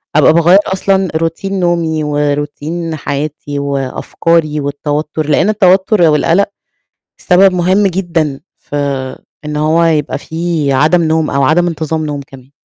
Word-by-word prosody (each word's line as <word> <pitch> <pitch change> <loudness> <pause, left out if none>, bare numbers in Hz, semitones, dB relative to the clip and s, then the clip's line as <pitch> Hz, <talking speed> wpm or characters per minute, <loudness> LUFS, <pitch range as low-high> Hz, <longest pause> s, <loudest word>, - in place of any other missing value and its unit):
أبقى 155 - +5
باغير 170 +4 +5
أصلًا 190 0 0
روتين 165 +4 -2
نومي 165 -3 0
وروتين 150 +3 -2
حياتي 145 0 -4
وأفكاري 150 +3 -1
والتوتر 150 +2 -3
لان 165 +7 +2
التوتر 195 0 +3
والقلق 165 +4 +3 0.7
سبب 190 +1 +4
مهم 185 +3 +2
جدًا 165 -6 -1 0.2
في 145 - -8 0.7
إن 150 0 -4
هو 160 +3 +2
يبقى 155 -3 0
في 160 -3 -2
عدم 155 +6 +3
نوم 160 -1 0
أو 140 - 0
عدم 170 +5 +2
انتظام 160 -1 -2
نوم 145 -1 -4
كمان. 130 0 -15
160 Hz, 130 wpm, -13 LUFS, 150-175 Hz, 0.7 s, أبقى